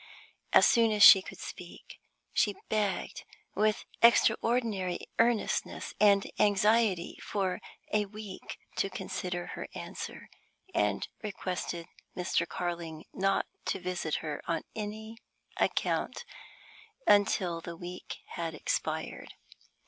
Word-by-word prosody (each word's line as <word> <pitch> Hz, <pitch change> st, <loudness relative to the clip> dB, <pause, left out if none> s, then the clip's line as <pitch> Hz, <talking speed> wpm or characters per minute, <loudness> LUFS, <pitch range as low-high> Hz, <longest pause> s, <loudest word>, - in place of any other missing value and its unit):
As -, -, +7 dB
soon 230 Hz, -1 st, +4 dB
as 210 Hz, -1 st, +4 dB
she 190 Hz, -, +11 dB
could -, -, -10 dB
speak, -, -, -10 dB, 0.3 s
she 205 Hz, -2 st, +2 dB
begged 210 Hz, -3 st, -1 dB, 0.3 s
with 215 Hz, 0 st, +1 dB, 0.2 s
extraordinary 225 Hz, -5 st, +3 dB
earnestness 230 Hz, -1 st, +1 dB
and 200 Hz, -1 st, +5 dB
anxiety 210 Hz, -2 st, +3 dB
for 190 Hz, -3 st, -1 dB, 0.3 s
a 210 Hz, -1 st, +3 dB
week 210 Hz, -1 st, -8 dB, 0.2 s
to 195 Hz, -, +1 dB
consider 180 Hz, -2 st, -4 dB
her -, -, -6 dB
answer, -, -, -7 dB, 0.5 s
and -, -, +1 dB
requested 180 Hz, -4 st, -4 dB, 0.3 s
Mr. 175 Hz, -1 st, 0 dB
Carling 170 Hz, -3 st, -4 dB
not 195 Hz, 0 st, +1 dB, 0.2 s
to 195 Hz, -, -1 dB
visit 180 Hz, -4 st, -2 dB
her 150 Hz, -1 st, -3 dB
on 165 Hz, -, -1 dB
any 220 Hz, +1 st, -6 dB, 0.4 s
account -, -, 0 dB, 0.8 s
until 190 Hz, -4 st, +3 dB
the 170 Hz, 0 st, -7 dB
week 180 Hz, +1 st, -8 dB
had 165 Hz, -2 st, -4 dB
expired. -, -, -3 dB
195 Hz, 110 wpm, -30 LUFS, 175-215 Hz, 0.8 s, she